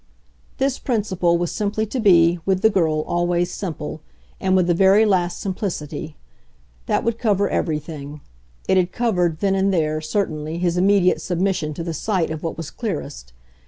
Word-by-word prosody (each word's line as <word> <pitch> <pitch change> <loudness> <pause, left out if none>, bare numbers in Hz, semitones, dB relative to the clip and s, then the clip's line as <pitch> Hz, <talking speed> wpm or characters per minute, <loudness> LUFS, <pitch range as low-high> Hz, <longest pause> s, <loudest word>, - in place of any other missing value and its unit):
This 270 -1 0
principle 190 -8 0
was 175 0 -2
simply 210 +1 -1
to 250 +5 -4
be, 175 -5 +5
with 190 0 0
the 220 - +5
girl, 160 -6 +1
always 175 +2 0
simple 160 -4 -5 0.4
and 190 -1 +1
with 185 -2 +3
the 175 - +2
very 195 +5 +5
last 180 -4 +1
simplicity. 170 -5 -4 0.7
That - - +1
would 230 0 -1
cover 205 -4 +2
everything. 150 -3 -3 0.5
It 190 - +3
had 180 -1 +2
covered, 180 -9 0
then 195 -1 +2
and 195 0 +2
there, 155 -3 0
certainly, 155 -2 -2
his 175 -1 0
immediate 185 0 +3
submission 180 -4 -1
to 165 - -4
the 165 -1 -4
sight 175 0 -1
of 160 -1 -5
what 165 - -4
was 165 -2 -6
clearest. 145 - -5
180 Hz, 165 wpm, -21 LUFS, 160-200 Hz, 0.7 s, be